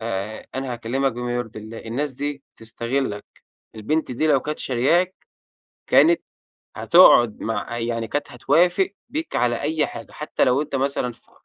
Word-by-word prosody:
آآ، 110 -1 -4
أنا 130 -1 -3
هاكلّمك 125 +3 -1
بما 120 0 -3
يرضي 120 -3 -4
الله، 110 +1 -9
الناس 130 +6 -3
دي 145 +1 -4
بتستغلك، 115 0 -3 0.5
البنت 130 +7 -1
دي 155 +6 0
لو 145 -3 +4
كانت 150 +3 -5
شاريَّاك، 165 +9 +1 0.7
كانت 335 +1 +5 0.5
هتقعد 120 - +6
مع 115 +1 -3
يعني 115 -1 -2
كانت 145 +6 -3
هتوافق 175 +9 +2 0.2
بيك 315 +2 -4
على 120 -1 +1
أي 150 0 0
حاجة، - - -9
حتّى 150 0 -1
لو 130 +3 +2
أنت 150 - -8
مثلًا 135 -2 -1
ف - - -22
125 Hz, 150 wpm, -22 LUFS, 115-150 Hz, 0.7 s, هتقعد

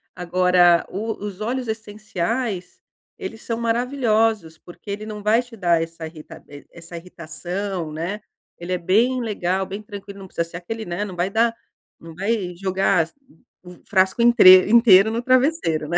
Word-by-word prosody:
Agora 180 -1 +3
o 220 +4 -3
os 205 -1 -7
óleos 245 +2 -3
essenciais, 215 -2 -4 0.4
eles 375 - -7
são 230 -1 -4
maravilhosos 225 - 0
porque 175 +4 -14
ele 210 +1 -5
não 210 -1 -7
vai 220 +3 +3
te 245 -1 -14
dar 175 -5 +1
essa 165 0 -6
irritab 155 -1 -13 0.3
essa 170 0 -11
irritação, 175 +1 -6
né. 175 +7 -4 0.4
Ele 175 +2 -5
é - - 0
bem 230 +9 +1
legal, 190 -4 -1
bem 200 +3 -7
tranquilo 200 -1 -10
não 190 - -10
precisa 170 -2 -3
ser 175 - -7
aquele, 220 +5 -6
né, 175 +4 -3
não 190 -3 -8
vai 175 +2 -1
dar 230 +2 +1 0.4
não 165 0 -12
vai 195 -2 -2
jogar 190 -3 +1 0.5
o 180 0 -12
frasco 190 +2 +2
inteiro- 200 -6 +7
inteiro 220 -3 +6
no 230 +1 -2
travesseiro, 255 - +1
né. 170 - +1
195 Hz, 160 wpm, -21 LUFS, 175-225 Hz, 0.5 s, inteiro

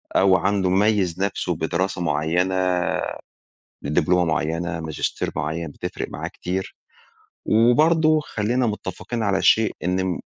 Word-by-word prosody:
أو 95 -1 +5
عنده 95 0 +1
ميز 95 -2 +2
نفسه 95 -3 -1
بدراسة 85 +3 -2
مُعيّنة، 85 +4 0 1.3
بدبلومة 90 +4 +2
مُعيّنة، 80 +1 -1
ماجستير 80 -2 -3
معيّن 80 +2 -3
بتفرق - - -5
معاه - - -5
كتير، 95 +2 -5 0.7
وبرضه 155 +8 +4
خلّينا 120 -2 -1
متفقين 105 +3 -4
على 95 -1 +1
شيء 110 -1 +4
إن 90 +1 0
الم 95 -2 -1
95 Hz, 115 wpm, -22 LUFS, 85-105 Hz, 1.3 s, أو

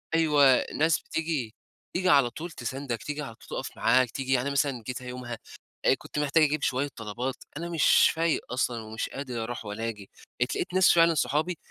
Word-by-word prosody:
أيوه، 145 -5 +5
ناس 160 +1 +2
بتيجي 150 -9 -3 0.4
تيجي 185 0 +1
على 140 -5 +5
طول 165 +7 -7
تساندك، 125 -2 -4
تيجي 150 0 -4
على 115 -6 -7
طول - - -18
تُقف - - -6
معاك، 125 +1 +3
تيجي 130 -1 -2
يعني 130 +2 +1
مثلًا 135 -4 0
جيتها 125 0 -5
يومها 125 -2 -6 0.6
كنت 150 - -6
محتاج 150 +2 +3
أجيب 150 -1 +1
شوية 135 +2 +1
طلبات، 120 +4 -4 0.2
أنا 170 +1 -4
مش 165 -3 +5
فايق 165 -1 +1
أصلًا، 120 -2 -1
ومش 110 +1 -4
قادر 125 -5 -5
أرُوح 120 -1 -6
ولا 110 +3 -4
آجي، 105 -3 -9 0.3
اتلاقيت 175 +8 -1
ناس 185 0 +5
فعلًا 165 -1 +5
صحابي، 155 +4 0
135 Hz, 180 wpm, -27 LUFS, 120-155 Hz, 0.6 s, أيوه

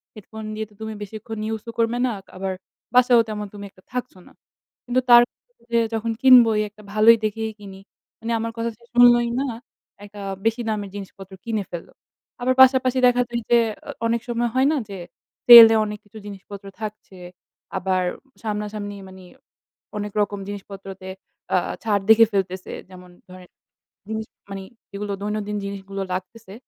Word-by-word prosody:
Headphone 220 +1 -10
দিয়ে 220 0 -3
তো 210 - -22
তুমি 220 0 -5
বেশিক্ষণ 220 +2 -7
ইউজ 220 -1 -3
ও - - -4
করবে 230 +1 +1
না, 250 - 0 0.3
আবার 190 0 -3 0.4
বাসায়ও 245 -2 +6
তেমন 210 -1 -4
তুমি 205 0 -9
একটা 185 - -23
থাকছো 250 -5 -4
না।" - - -17 0.5
কিন্তু 250 +1 +1
তার 240 0 +10
কথা 485 - -37
যে 235 - +4
যখন 225 +1 -1
কিনবই, 240 -5 +7
একটা 210 +1 -18
ভালোই 225 +2 +6
দেখেই 220 +1 -2
কিনি। 195 -1 -11 0.4
মানে 230 +1 -4
আমার 230 0 -3
কথা 230 0 -1
সে 235 - -25
শুনলোই 240 -1 +6
না, 275 - 0 0.6
একটা 205 0 -11 0.2
বেশি 225 +2 +1
দামের 205 -2 -3
জিনিসপত্র 195 -1 -10
কিনে 220 -3 -1
ফেলল। 170 -1 -7 0.5
আবার 255 +1 +2
পাশাপাশি 260 0 +5
দেখা 245 0 +3
যায় 235 0 -3
যে, 240 - +7 0.3
আ - - -9 0.2
অনেক 230 0 0
সময় 240 0 0
হয় 265 +2 +4
না - - +1
যে 195 - -7 0.5
সেল 235 -2 +13
এ - - +3
অনেক 210 0 -6
কিছু 205 +2 -14
জিনিসপত্র 200 0 -10 0.2
থাকছে। 210 -3 -8 0.6
আবার 185 0 0 0.4
সামনাসামনি 210 -1 -4
মানে 190 0 -13 0.7
অনেক 210 0 -4
রকম 205 0 -2
জিনিসপত্রতে 195 -2 -8 0.5
আ - - +5 0.3
ছাড় 205 -3 +1
দেখে 225 +1 +8
ফেলতেছে। 185 -1 -2 0.2
যেমন 180 -1 -13 0.2
ধরনের 180 -1 -13 0.6
জিনিস 220 0 -4 0.2
মানে 195 -1 -6 0.3
যেইগুলো 200 0 -5
দৈনন্দিন 210 0 -3
জিনিসগুলো 195 0 -6
লাগতেছে, 190 +2 -7
215 Hz, 165 wpm, -22 LUFS, 200-230 Hz, 0.7 s, সেল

